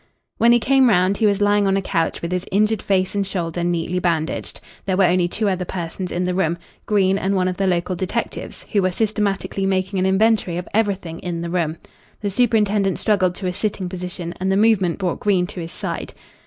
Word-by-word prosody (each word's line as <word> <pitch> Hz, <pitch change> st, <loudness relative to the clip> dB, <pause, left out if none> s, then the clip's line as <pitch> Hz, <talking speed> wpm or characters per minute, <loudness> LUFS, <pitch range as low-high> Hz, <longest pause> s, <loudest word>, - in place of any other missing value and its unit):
When 235 Hz, -, +5 dB
he 240 Hz, -, +6 dB
came 265 Hz, +2 st, +4 dB
round 185 Hz, -1 st, +3 dB
he 220 Hz, -, +3 dB
was 205 Hz, 0 st, +2 dB
lying 205 Hz, 0 st, +3 dB
on 195 Hz, 0 st, +2 dB
a -, -, 0 dB
couch 165 Hz, -2 st, -1 dB
with 170 Hz, -, -3 dB
his 180 Hz, 0 st, -2 dB
injured 210 Hz, +1 st, +2 dB
face 185 Hz, -1 st, +1 dB
and 205 Hz, -, 0 dB
shoulder 175 Hz, -3 st, -3 dB
neatly 175 Hz, +1 st, -1 dB
bandaged. 165 Hz, -3 st, -2 dB, 0.3 s
There 185 Hz, -1 st, +1 dB
were 195 Hz, -, +4 dB
only 180 Hz, 0 st, +3 dB
two 210 Hz, +4 st, -2 dB
other 185 Hz, -2 st, 0 dB
persons 180 Hz, +1 st, -5 dB
in 180 Hz, +1 st, -1 dB
the 180 Hz, -, 0 dB
room, 175 Hz, -2 st, 0 dB, 0.3 s
Green 195 Hz, -2 st, +2 dB
and 195 Hz, +1 st, 0 dB
one 185 Hz, -1 st, +1 dB
of 180 Hz, -1 st, -2 dB
the 195 Hz, -, +1 dB
local 180 Hz, 0 st, 0 dB
detectives, 185 Hz, +1 st, -4 dB
who 205 Hz, -, +3 dB
were 185 Hz, 0 st, +1 dB
systematically 200 Hz, -2 st, -1 dB
making 190 Hz, 0 st, 0 dB
an 185 Hz, -, +2 dB
inventory 190 Hz, -2 st, +2 dB
of 180 Hz, -, -5 dB
everything 195 Hz, -6 st, -1 dB
in 175 Hz, -2 st, -4 dB
the 170 Hz, 0 st, -4 dB
room. 165 Hz, -3 st, -1 dB, 0.4 s
The 205 Hz, -2 st, -1 dB
superintendent 210 Hz, -3 st, +2 dB
struggled 185 Hz, -4 st, +1 dB
to 190 Hz, -, -6 dB
a 180 Hz, -, -1 dB
sitting 200 Hz, -1 st, -2 dB
position 180 Hz, -1 st, -5 dB
and 190 Hz, +1 st, 0 dB
the 190 Hz, -, +2 dB
movement 205 Hz, -5 st, +3 dB
brought 185 Hz, -3 st, -2 dB
Green 190 Hz, -4 st, +2 dB
to 185 Hz, 0 st, -8 dB
his 165 Hz, -1 st, -6 dB
side. -, -, -5 dB
190 Hz, 220 wpm, -21 LUFS, 180-205 Hz, 0.4 s, he